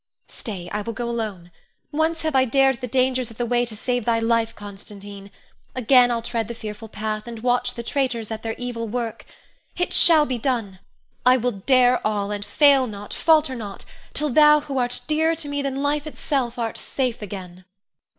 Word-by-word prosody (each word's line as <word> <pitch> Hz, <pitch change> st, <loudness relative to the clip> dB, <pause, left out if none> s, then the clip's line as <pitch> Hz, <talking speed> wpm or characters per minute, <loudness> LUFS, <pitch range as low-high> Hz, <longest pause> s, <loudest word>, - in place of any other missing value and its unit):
Stay! 190 Hz, -7 st, -7 dB
I 210 Hz, -, -2 dB
will 230 Hz, +3 st, -5 dB
go 240 Hz, +1 st, -4 dB
alone. 210 Hz, -7 st, -4 dB, 0.4 s
Once 320 Hz, +2 st, 0 dB
have 315 Hz, -3 st, -1 dB
I 260 Hz, -, +5 dB
dared 270 Hz, +1 st, +2 dB
the 250 Hz, -, -3 dB
dangers 255 Hz, 0 st, +1 dB
of 225 Hz, -, -13 dB
the 240 Hz, -, -1 dB
way 240 Hz, +1 st, +1 dB
to 220 Hz, -, -6 dB
save 245 Hz, +2 st, -1 dB
thy 230 Hz, +1 st, +2 dB
life, 230 Hz, 0 st, +1 dB
Constantine; 200 Hz, 0 st, -10 dB, 0.5 s
again 250 Hz, 0 st, +5 dB
I'll 235 Hz, -1 st, -1 dB
tread 230 Hz, -2 st, -2 dB
the 235 Hz, -, -6 dB
fearful 215 Hz, 0 st, -7 dB
path, 215 Hz, +1 st, -4 dB
and 230 Hz, -1 st, -8 dB
watch 245 Hz, 0 st, +1 dB
the 235 Hz, -, -5 dB
traitors 235 Hz, -4 st, -1 dB
at 220 Hz, 0 st, -4 dB
their 225 Hz, -1 st, -3 dB
evil 240 Hz, -2 st, -4 dB
work. 230 Hz, 0 st, -4 dB, 0.5 s
It 355 Hz, -, -1 dB
shall 320 Hz, -3 st, +6 dB
be 255 Hz, -4 st, -3 dB
done! 225 Hz, -7 st, -2 dB, 0.4 s
I 255 Hz, +1 st, +6 dB
will 245 Hz, 0 st, 0 dB
dare 250 Hz, +4 st, +3 dB
all, 205 Hz, -1 st, -1 dB
and 205 Hz, 0 st, -3 dB
fail 275 Hz, +3 st, +4 dB
not, 205 Hz, -2 st, -8 dB
falter 310 Hz, -4 st, +3 dB
not, 205 Hz, -5 st, -7 dB, 0.3 s
till 300 Hz, -1 st, 0 dB
thou 300 Hz, +2 st, +6 dB
who 275 Hz, -2 st, -3 dB
art 245 Hz, 0 st, -1 dB
dearer 320 Hz, +2 st, +2 dB
to 315 Hz, -2 st, -5 dB
me 285 Hz, 0 st, -2 dB
than 275 Hz, 0 st, -2 dB
life 295 Hz, +1 st, 0 dB
itself 265 Hz, -5 st, -2 dB
art 230 Hz, -2 st, -3 dB
safe 250 Hz, -4 st, -2 dB
again. 185 Hz, -3 st, -8 dB
240 Hz, 195 wpm, -23 LUFS, 215-265 Hz, 0.5 s, shall